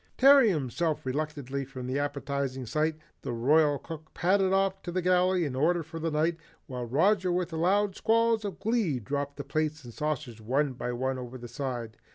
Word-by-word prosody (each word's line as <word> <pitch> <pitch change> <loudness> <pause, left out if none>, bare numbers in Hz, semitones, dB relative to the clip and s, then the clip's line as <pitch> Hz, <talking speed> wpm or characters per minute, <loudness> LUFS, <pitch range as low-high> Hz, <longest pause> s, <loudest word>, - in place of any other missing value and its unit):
Tearing 270 -3 +7
himself 155 - -1
reluctantly 140 -1 -3
from 130 -1 -8
the 130 +3 -1
appetizing 140 -2 -2
sight, 155 +6 0 0.3
the - - -4
Royal 145 +5 +3
Cook 155 +1 -10
padded 190 +1 +2
off 195 0 +1
to - - -7
put 175 - -6
the 185 - +2
galley 180 0 +3
in 135 -3 -3
order 165 +5 +2
for 165 +1 -8
the 165 +1 -1
night, 160 +2 +1 0.3
while 125 -2 -5
Roger 180 - +2
with 175 -1 -1
loud 190 +4 +2
squalls 230 0 +2
of 200 -4 -4
glee 205 - +1
dropped 140 +4 -3
the 140 - -4
plates 155 +1 -2
and 120 -1 -10
saucers 135 -7 -3
one 135 +5 0
by 125 0 -4
one 130 +2 -2
over 125 0 -7
the 120 -1 -8
side. 120 -3 -5
150 Hz, 195 wpm, -29 LUFS, 130-180 Hz, 0.3 s, Tearing